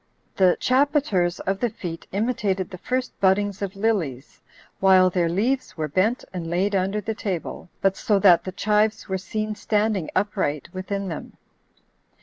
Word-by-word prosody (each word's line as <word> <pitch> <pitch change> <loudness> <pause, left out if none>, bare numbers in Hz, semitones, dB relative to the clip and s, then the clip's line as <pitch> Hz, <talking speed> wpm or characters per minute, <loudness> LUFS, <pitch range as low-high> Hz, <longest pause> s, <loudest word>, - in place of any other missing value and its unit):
The 185 -2 +4
chapiters 255 - +2
of 195 +1 -1
the 240 - +1
feet 165 -5 -7
imitated 200 -3 -1
the 185 - -8
first 255 +4 -2
buddings 200 +1 +2
of 200 0 -3
lilies, 185 - -2 0.4
while 185 -1 +5
their 175 -2 +1
leaves 235 +9 -1
were 155 -1 -1
bent 190 - +1
and 170 -3 -4
laid 190 +4 0
under 195 +2 0
the 220 +2 -3
table, 185 -4 -5
but 195 0 +2
so 210 - +1
that 185 -3 +6
the 185 - -5
chives 210 +2 +1
were 190 -1 -2
seen 215 +3 -3
standing 210 -3 0
upright 185 -8 -1
within 195 +1 -3
them. 165 -4 -7
195 Hz, 155 wpm, -24 LUFS, 185-215 Hz, 0.4 s, that